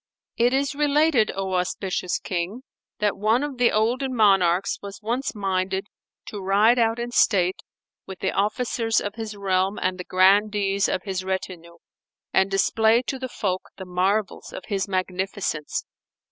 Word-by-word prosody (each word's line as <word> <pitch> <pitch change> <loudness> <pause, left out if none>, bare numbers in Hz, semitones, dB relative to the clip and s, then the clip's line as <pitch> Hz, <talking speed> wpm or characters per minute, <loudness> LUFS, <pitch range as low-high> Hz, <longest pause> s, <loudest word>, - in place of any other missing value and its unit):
It 240 +1 +3
is 275 +1 0
related, 295 -4 +2
O 190 -1 -3
auspicious 180 0 -1
King, 185 +7 -4 0.3
that 210 -1 0
one 220 +6 +2
of 280 -4 -5
the 245 - +4
olden 250 +5 0
monarchs 195 -4 +3
was 200 0 -8
once 240 +4 -2
minded 190 -1 -1 0.4
to 205 - -7
ride 210 +6 +4
out 225 0 +2
in 240 0 -4
state 185 -5 +2 0.5
with 190 - -7
the 190 - -1
Officers 225 +2 0
of 205 - -4
his 220 -2 -6
realm 195 0 0
and 185 0 -1
the - - -4
Grandees 200 +1 +3
of 185 - -2
his 190 -2 -3
retinue 180 -3 -5 0.6
and 190 0 +3
display 220 +4 +3
to 265 +1 -4
the 260 0 -5
folk 190 -5 -3
the 190 - -7
marvels 190 +3 -1
of - - -8
his 200 -2 -1
magnificence. 185 -4 -2
200 Hz, 155 wpm, -24 LUFS, 185-225 Hz, 0.6 s, the